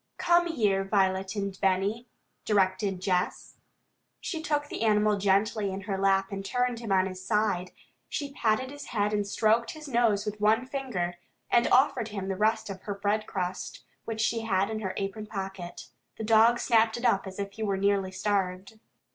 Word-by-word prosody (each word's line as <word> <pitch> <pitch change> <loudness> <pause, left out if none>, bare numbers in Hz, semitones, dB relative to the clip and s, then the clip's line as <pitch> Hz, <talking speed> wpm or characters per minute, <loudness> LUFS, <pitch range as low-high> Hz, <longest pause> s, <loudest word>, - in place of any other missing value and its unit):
"Come 345 0 +3
here, 210 - +1
Violet 195 0 +1
and 200 -2 -3
Benny," 195 +5 +1 0.4
directed 190 -2 +1
Jess. 185 -1 -1 0.6
She 325 -3 -4
took 295 -2 -1
the - - -6
animal 210 -1 +3
gently 200 +1 +2
in 190 +1 -5
her 195 0 -3
lap 195 0 +2
and 195 0 -4
turned 245 +3 -1
him 230 -4 -5
on 190 -1 +4
his 185 -1 -6
side. 210 -4 0 0.4
She 285 -2 -4
patted 245 +2 0
his 290 0 -9
head 210 -2 -1
and 205 -1 0
stroked 225 +3 +2
his 310 -1 -10
nose 230 -5 +2
with 210 0 -5
one 220 +4 +3
finger, 230 -11 -3 0.3
and 240 - +4
offered 265 -3 +3
him 195 -3 -5
the 190 - -1
rest 215 +3 +1
of 195 -2 -7
her 205 - -4
breadcrust, 200 -3 -2 0.2
which 220 -1 -3
she 230 +1 +1
had 200 -3 0
put - - -4
in 215 - -3
her 190 -2 -3
apron 200 +2 -4
pocket. 190 -4 -6 0.3
The - - -5
dog 225 +2 +5
snapped 225 -1 +3
it 240 - -4
up 195 -4 +2
as 190 - -8
if 200 -1 -4
he 220 - -10
were 200 -3 0
nearly 200 -1 +1
starved. 195 +1 -2
205 Hz, 185 wpm, -28 LUFS, 195-225 Hz, 0.6 s, dog